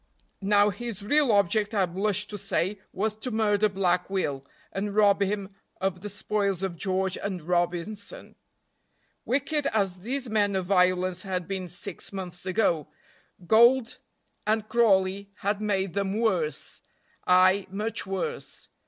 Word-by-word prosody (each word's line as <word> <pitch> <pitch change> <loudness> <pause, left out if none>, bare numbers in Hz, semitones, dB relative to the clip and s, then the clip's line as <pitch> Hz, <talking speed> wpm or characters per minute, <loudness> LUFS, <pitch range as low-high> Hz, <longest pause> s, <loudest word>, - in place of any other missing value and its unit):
Now 205 +1 +4
his 215 -1 -6
real 285 +3 +3
object, 205 +2 +2
I 195 -2 +3
blush 200 +3 0
to 210 - -6
say, 200 0 -1
was 215 +2 -1
to 235 +4 -2
murder 215 -2 +2
Black 180 -2 0
Will, 145 -9 -1 0.3
and 200 +1 -3
rob 205 -1 +4
him 200 0 -1 0.3
of 190 -2 -1
the 210 - -5
spoils 200 -1 -1
of 190 -3 -2
George 190 +1 -1
and 190 -5 -4
Robinson. 175 +4 -2 0.9
Wicked 280 +3 0
as 195 -4 0
these 255 +7 -3
men 205 -3 +1
of 190 -1 -1
violence 185 -1 +2
had 185 -4 -3
been 190 -2 -4
six 180 +1 -6
months 180 -2 -6
ago, 185 -6 +1 0.6
gold 235 +4 +4 0.5
and 215 0 +1
Crawley 200 -4 +2
had 205 0 -2
made 195 -4 0
them 200 +1 -1
worse, 180 -9 -1 0.5
ay, 185 +2 +5
much 210 +2 -3
worse. 460 - -5
200 Hz, 140 wpm, -27 LUFS, 185-215 Hz, 0.9 s, ay